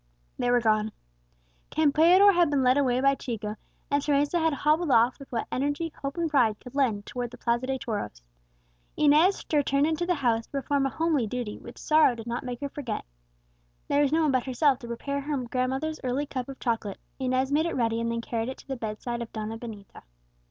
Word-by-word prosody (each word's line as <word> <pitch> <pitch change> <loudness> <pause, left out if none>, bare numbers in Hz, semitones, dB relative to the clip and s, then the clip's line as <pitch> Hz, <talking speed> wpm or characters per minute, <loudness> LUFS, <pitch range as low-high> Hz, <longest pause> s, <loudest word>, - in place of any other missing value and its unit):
They 245 - +1
were 245 0 +4
gone. 215 -1 +1 0.8
Campeador 330 +7 +5
had 345 -3 +3
been 280 -2 +1
led 255 0 +4
away 255 -3 +2
by 275 +1 +4
Chico, 220 -6 -4 0.4
and 285 0 +2
Teresa 290 +3 +1
had 320 0 +2
hobbled 305 +3 +1
off 240 +1 +4
with 275 - -12
what 230 -2 -2
energy 290 +4 -1
hope 275 +3 -4
and 340 -1 +1
pride 245 -8 +2
could 250 - -12
lend 235 -8 0
towards 245 -1 -4
the 245 - -12
Plaza 235 +1 0
de 265 0 -1
Toros. 205 - -5 0.7
Inez 305 +6 +4
returned 285 -1 +3
into 320 +2 -1
the 360 - +2
house 235 -5 0
to - - -41
perform 275 0 0
a - - -2
homely 310 -5 0
duty 240 -2 -4
which 235 - -11
sorrow 305 -5 +4
did 225 -1 -8
not 240 +1 -3
make 250 0 -6
her 285 - -3
forget. 265 -7 -5 0.8
There 285 0 +3
was 285 -1 +2
no 320 +1 +3
one 300 - +3
but 255 0 0
herself 265 +1 +2
to 240 - -9
prepare 280 +4 -3
her 290 +1 -2
grandmother's 265 +6 -2
early 260 +3 -1
cup 260 -2 -5
of 270 - -7
chocolate; 225 -5 -2 0.2
Inez 260 +1 0
made 310 +3 +2
it 335 - -3
ready, 230 -2 0
and 230 0 -1
then 230 0 -2
carried 230 0 -3
it 260 - -6
to - - -16
the 270 -1 -4
bedside 235 +2 -4
of 235 - -6
Donna 220 0 -4
Benita. 220 -4 -10
260 Hz, 215 wpm, -27 LUFS, 235-290 Hz, 0.8 s, Campeador